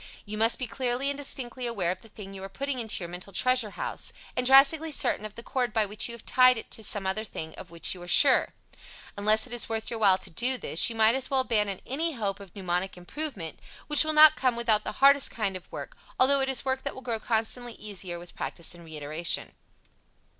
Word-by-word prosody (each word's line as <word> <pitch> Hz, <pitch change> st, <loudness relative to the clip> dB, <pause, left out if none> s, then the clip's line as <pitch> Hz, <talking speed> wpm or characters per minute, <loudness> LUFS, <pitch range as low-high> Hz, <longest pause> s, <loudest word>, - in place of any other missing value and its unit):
You 210 Hz, 0 st, -6 dB
must 225 Hz, +2 st, +3 dB
be 255 Hz, -, -3 dB
clearly 255 Hz, +3 st, -1 dB
and 280 Hz, -, -5 dB
distinctly 255 Hz, -3 st, -3 dB
aware 195 Hz, -7 st, -1 dB
of 185 Hz, -, -6 dB
the 225 Hz, -, -16 dB
thing 195 Hz, -2 st, -10 dB
you 195 Hz, -, -9 dB
are 195 Hz, -, -7 dB
putting 275 Hz, +4 st, -3 dB
into 220 Hz, -5 st, -2 dB
your -, -, -5 dB
mental 180 Hz, +3 st, -8 dB
treasure 255 Hz, +2 st, +1 dB
house, -, -, -3 dB, 0.2 s
and 250 Hz, 0 st, 0 dB
drastically 285 Hz, +4 st, +6 dB
certain 260 Hz, -7 st, 0 dB
of 215 Hz, -, -17 dB
the 235 Hz, -, -9 dB
cord 245 Hz, -4 st, -2 dB
by 220 Hz, -2 st, +2 dB
which 210 Hz, +3 st, -1 dB
you 235 Hz, -, -6 dB
have 235 Hz, -, -14 dB
tied 255 Hz, -1 st, +5 dB
it 225 Hz, -, -8 dB
to 220 Hz, -, 0 dB
some 205 Hz, -1 st, -3 dB
other 190 Hz, +3 st, -1 dB
thing 160 Hz, -7 st, -7 dB
of -, -, -11 dB
which 170 Hz, -1 st, -2 dB
you 180 Hz, -, -11 dB
are 175 Hz, -, -10 dB
sure. 265 Hz, +9 st, +5 dB, 0.6 s
Unless 215 Hz, +2 st, +2 dB
it 245 Hz, -, -6 dB
is 240 Hz, -, -1 dB
worth 225 Hz, 0 st, -3 dB
your 230 Hz, -, -3 dB
while 195 Hz, -3 st, +5 dB
to -, -, -8 dB
do 250 Hz, +9 st, +1 dB
this, 165 Hz, -, +2 dB
you 230 Hz, -, -6 dB
might 220 Hz, 0 st, +5 dB
as 265 Hz, 0 st, -1 dB
well 270 Hz, -1 st, +2 dB
abandon 210 Hz, -6 st, -1 dB
any 320 Hz, +5 st, -1 dB
hope 205 Hz, -6 st, -3 dB
of 195 Hz, -4 st, -14 dB
mnemonic 180 Hz, -1 st, -2 dB
improvement, 190 Hz, -, -5 dB, 0.3 s
which 295 Hz, 0 st, +5 dB
will 310 Hz, -, -1 dB
not 310 Hz, 0 st, +8 dB
come 255 Hz, -2 st, 0 dB
without 225 Hz, -3 st, +1 dB
the -, -, -5 dB
hardest 280 Hz, 0 st, +6 dB
kind 205 Hz, -4 st, -3 dB
of 185 Hz, -, -8 dB
hard -, -, -30 dB
work, -, -, -8 dB, 0.2 s
although 275 Hz, +2 st, +5 dB
it 270 Hz, -, 0 dB
is 265 Hz, 0 st, 0 dB
work 265 Hz, 0 st, -1 dB
that 280 Hz, -, -5 dB
will 260 Hz, -, -10 dB
grow 235 Hz, -3 st, -2 dB
constantly 230 Hz, +2 st, -2 dB
easier 195 Hz, -5 st, -6 dB
with 175 Hz, 0 st, -12 dB
practice 170 Hz, -, -3 dB
and 170 Hz, 0 st, -12 dB
reiteration. 155 Hz, +1 st, -3 dB
225 Hz, 240 wpm, -27 LUFS, 195-260 Hz, 0.6 s, not